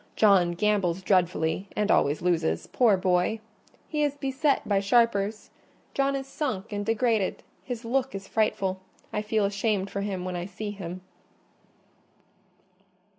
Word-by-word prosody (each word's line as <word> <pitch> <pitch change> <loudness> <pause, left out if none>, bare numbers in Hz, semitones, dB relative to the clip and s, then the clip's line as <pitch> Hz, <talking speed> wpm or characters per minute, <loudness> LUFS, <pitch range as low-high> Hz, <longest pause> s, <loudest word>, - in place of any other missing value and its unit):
John 190 -5 +4
gambles 190 -2 +1
dreadfully, 180 -1 +1
and 210 0 +1
always 145 +4 +2
loses—poor 180 - +2
boy! 185 +4 +1 0.5
He 300 -1 -2
is 290 -1 0
beset 275 +1 0
by 200 -2 +3
sharpers: 210 0 +1 0.4
John 275 0 +1
is 270 -1 -3
sunk 240 -8 -4
and 205 0 -2
degraded—his 225 +2 -1
look 260 0 0
is 195 0 -6
frightful—I 195 -1 -2
feel 215 -1 +1
ashamed 200 -1 -1
for 200 - -3
him 190 -3 -3
when 185 -1 -3
I 175 +1 -4
see 205 +2 -5
him." 185 -3 -7
205 Hz, 125 wpm, -27 LUFS, 185-230 Hz, 0.5 s, John